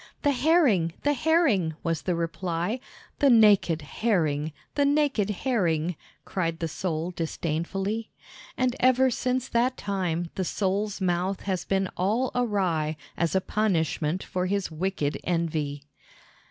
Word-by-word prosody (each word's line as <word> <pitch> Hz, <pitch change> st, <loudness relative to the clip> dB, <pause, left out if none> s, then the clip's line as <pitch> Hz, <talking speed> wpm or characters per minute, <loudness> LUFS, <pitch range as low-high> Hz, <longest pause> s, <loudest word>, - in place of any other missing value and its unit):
"The 285 Hz, -, +4 dB
Herring, 255 Hz, -, +3 dB
the 290 Hz, -, +3 dB
Herring!" 280 Hz, -, +2 dB
was 165 Hz, -3 st, -1 dB
the 175 Hz, +6 st, -1 dB
reply. 170 Hz, +5 st, -2 dB, 0.4 s
"The 280 Hz, -, +5 dB
nak 215 Hz, -6 st, +6 dB
ed 165 Hz, -2 st, -1 dB
Herring, 155 Hz, -3 st, 0 dB, 0.2 s
the 285 Hz, -, +2 dB
nak 285 Hz, -3 st, +2 dB
ed 205 Hz, 0 st, +1 dB
Herring!" 180 Hz, -, 0 dB, 0.3 s
cried 165 Hz, -3 st, -2 dB
the 165 Hz, -, -2 dB
Sole 165 Hz, +1 st, -3 dB
disdainfully. 175 Hz, +6 st, -2 dB, 0.5 s
And 255 Hz, -1 st, +1 dB
ever 255 Hz, +1 st, +4 dB
since 255 Hz, +1 st, -1 dB
that 245 Hz, +2 st, +1 dB
time 175 Hz, -4 st, -2 dB
the 190 Hz, -, -2 dB
Sole's 200 Hz, +2 st, -1 dB
mouth 185 Hz, +1 st, 0 dB
has 185 Hz, -3 st, -2 dB
been 195 Hz, -1 st, +1 dB
all 220 Hz, +8 st, +1 dB
awry 185 Hz, -10 st, 0 dB, 0.2 s
as 170 Hz, +2 st, 0 dB
a 190 Hz, -, +3 dB
punishment 180 Hz, -4 st, 0 dB
for 185 Hz, -1 st, -2 dB
his 200 Hz, -2 st, -1 dB
wicked 160 Hz, -3 st, -2 dB
envy. 155 Hz, -5 st, -1 dB
190 Hz, 140 wpm, -26 LUFS, 165-230 Hz, 0.5 s, nak